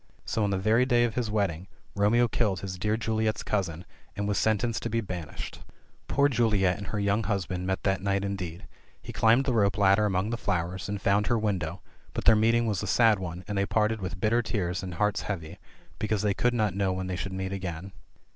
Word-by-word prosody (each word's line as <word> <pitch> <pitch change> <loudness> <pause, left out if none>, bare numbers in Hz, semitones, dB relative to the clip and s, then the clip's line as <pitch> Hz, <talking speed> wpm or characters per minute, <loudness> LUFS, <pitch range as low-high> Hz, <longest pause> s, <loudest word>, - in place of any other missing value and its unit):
So, 110 - -1
on 100 - +1
the 95 - 0
very 110 +5 +3
day 120 -2 +3
of 120 -2 0
his 120 -3 -1
wedding, 100 -4 -1 0.3
Romeo 110 +4 +3
killed 105 -5 0
his 95 -2 -5
dear 105 +3 0
Juliet's 110 -1 -1
cousin, 90 -4 -2 0.3
and 100 0 -2
was 105 - +1
sentenced 110 +1 +1
to 115 - -3
be 115 +1 0
ban 90 -7 -5
ished. - - -8 0.5
Poor 140 +1 +3
Juliet 105 -8 +2
and 100 - -7
her 105 - -3
young 100 +2 +1
husband 90 -2 -2
met 95 0 -1
that 95 -1 +1
night 100 0 0
indeed; 95 -2 -5 0.3
he - - -9
climbed 115 +4 +4
the 130 - +1
rope 100 -2 +2
ladder 100 +1 +4
among 95 +2 0
the 115 - -1
flowers, 90 -2 -2
and 105 0 -2
found 100 +2 +2
her 120 - +2
window, 95 -5 -2 0.3
but - - -3
their 110 - +7
meeting 115 +2 +3
was 105 -5 -1
a 105 - -4
sad 110 0 +4
one, 90 -1 -6
and 105 -1 -1
they 100 - +2
parted 110 0 +1
with 90 -1 -5
bitter 115 +4 +2
tears 95 -6 -2
and 90 -2 -6
hearts 105 +2 +1
heavy, 90 -2 -5 0.4
because 110 -1 0
they 105 -1 +2
could 120 +4 +1
not 105 -5 +1
know 95 0 0
when 95 0 -3
they 95 0 -3
should 95 +2 -4
meet 95 0 -3
again. 90 -1 -5
100 Hz, 225 wpm, -28 LUFS, 95-110 Hz, 0.5 s, their